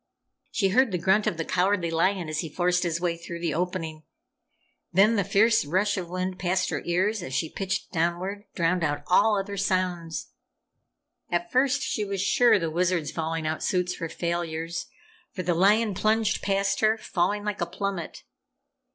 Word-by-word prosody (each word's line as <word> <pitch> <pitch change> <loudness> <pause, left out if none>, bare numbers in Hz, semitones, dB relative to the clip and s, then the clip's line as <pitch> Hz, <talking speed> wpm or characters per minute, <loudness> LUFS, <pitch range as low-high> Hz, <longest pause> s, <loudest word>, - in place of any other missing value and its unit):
She 195 -3 +1
heard 250 +3 +3
the 180 - 0
grunt 190 +5 +2
of 170 - 0
the 165 - -2
Cowardly 180 -2 +1
Lion 175 +1 +1
as 155 0 -3
he 160 - -3
forced 180 +3 +1
his 170 -2 -1
way 175 -1 0
through 170 0 -7
the 170 -2 -1
opening. 165 -2 -3 0.9
Then 205 +5 +5
the 200 - +2
fierce 205 +4 +3
rush 190 +8 +1
of 180 -3 -4
wind 185 +1 -3
past 185 +1 0
her - - -2
ears 190 +5 +1
as 130 -6 -5
she 160 - -1
pitched 190 -1 -3
downward, 180 +4 -1
drowned 170 0 +1
out 145 -1 -1
all 210 +3 +4
other 200 +1 -5
sounds. 185 -4 -1 1.0
At 175 0 -1
first 265 +1 +2
she 215 - -1
was 200 -1 -3
sure 235 +5 +4
the 165 -4 -2
Wizard's 175 -2 0
falling 165 0 -3
out 155 0 -2
suits 180 -1 -1
were 165 -2 -3
failures, 170 -1 -3 0.5
for 185 - -4
the 175 0 +1
lion 205 +5 +3
plunged 215 +2 +1
past 195 0 0
her, 220 0 +3
falling 205 0 -1
like 210 -2 -3
a 175 - 0
plummet. 190 -1 -4
180 Hz, 175 wpm, -26 LUFS, 170-200 Hz, 1.0 s, Then